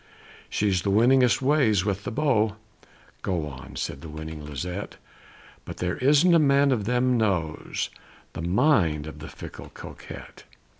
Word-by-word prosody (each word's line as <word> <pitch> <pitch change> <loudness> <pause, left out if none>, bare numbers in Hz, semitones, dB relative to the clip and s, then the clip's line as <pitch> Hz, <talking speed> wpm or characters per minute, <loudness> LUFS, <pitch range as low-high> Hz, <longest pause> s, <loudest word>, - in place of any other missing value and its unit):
"She's 100 -4 +1
the 100 - -1
winningest 120 +2 +4
ways 130 -9 +3
with 100 -1 -2
the - - -3
beaux" 110 -6 +1 0.7
("Go 85 -5 -1
on!" 65 -2 -10
said 70 - -4
the 80 - -9
winning 80 0 -7
Lisette), 90 +7 -5 0.7
"But - - -8
there 90 -1 -2
isn't 150 +7 +4
a 165 - +6
man 140 -1 +4
of 110 -6 0
them 125 +2 +2
knows 90 -8 -1 0.4
The - - -5
mind 85 - +2
of 75 -1 -9
the 80 - -8
fickle - - -10
Coquette! - - -10
100 Hz, 150 wpm, -26 LUFS, 80-130 Hz, 0.7 s, a